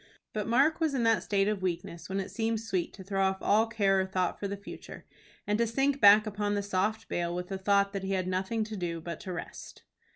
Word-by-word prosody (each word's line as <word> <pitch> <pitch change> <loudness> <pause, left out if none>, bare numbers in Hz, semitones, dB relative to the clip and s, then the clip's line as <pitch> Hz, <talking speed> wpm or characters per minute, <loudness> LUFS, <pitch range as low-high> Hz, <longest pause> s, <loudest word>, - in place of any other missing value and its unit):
But 210 -1 -2
Mark 275 +8 +3
was 315 -4 +1
in 245 - +1
that 225 -1 +3
state 200 -1 +1
of 210 -2 -1
weakness 170 -1 -4
when 195 +1 -1
it 190 - -5
seemed 225 -1 -1
sweet 195 -6 -2
to 190 - -10
throw 195 0 -2
off 190 0 +2
all 215 +4 +3
care 200 -4 +2
or - - -1
thought 185 -2 -1
for 200 - -2
the 200 +1 -4
future, 200 - -10 0.4
and 210 +1 0
to 235 - +3
sink 270 +4 0
back 210 +1 +8
upon 205 -1 -1
the 200 - -1
soft 200 +2 -1
bale 175 0 -2
with 180 0 -4
the 195 -1 -4
thought 200 +1 +2
that 195 - -3
he 195 +1 -2
had 185 -1 -1
nothing 190 +5 -1
to 215 0 -6
do 175 -3 -3
but 170 0 -6
to 185 - -7
rest. 175 - -8
200 Hz, 250 wpm, -29 LUFS, 190-220 Hz, 0.4 s, back